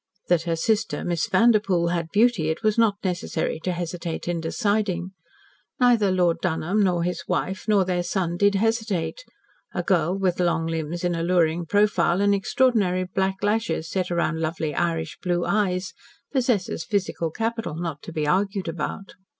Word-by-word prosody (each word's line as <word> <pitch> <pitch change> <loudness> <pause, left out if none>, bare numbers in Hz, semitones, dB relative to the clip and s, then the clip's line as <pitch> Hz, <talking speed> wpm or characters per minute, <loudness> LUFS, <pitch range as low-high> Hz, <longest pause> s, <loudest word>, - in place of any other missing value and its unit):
That 175 -1 +3
her 165 - +2
sister, 215 +6 0
Miss 175 +3 0
Vanderpoel, 200 -5 +3
had 170 -2 -2
beauty, 210 -7 +3
it 160 - -3
was 215 -1 +3
not 225 -3 +3
necessary 175 -4 -2
to 180 - -2
hesitate 175 -1 -4
in 175 -1 -1
deciding. 195 -1 -1 0.7
Neither 235 -6 +4
Lord 175 -2 +2
Dunholm 180 +3 0
nor 175 -3 +1
his 180 +1 -3
wife 190 +2 -2
nor 205 -3 +4
their 180 -1 0
son 175 -1 -1
did 200 +2 +3
hesitate. 225 - -1 0.5
A 175 - -1
girl 175 0 +1
with 185 -2 0
long 170 -2 +1
limbs 165 +1 -3
an 175 0 +1
alluring 170 -1 +1
profile, 195 -3 +2
and 200 0 +3
extraordinary 200 -3 +2
black 190 +1 -2
lashes 205 -6 0
set 185 -2 -1
round 170 -2 0
lovely 160 -1 -2
Irish 165 0 -2
blue 175 -1 0
eyes, 190 -3 0 0.4
possesses 245 -8 0
physical 190 -6 -1
capital 225 -1 -3
not 165 -3 -4
to - - -9
be 155 -2 -2
argued 195 +4 0
about. 170 +4 -4
180 Hz, 160 wpm, -24 LUFS, 170-205 Hz, 0.7 s, Neither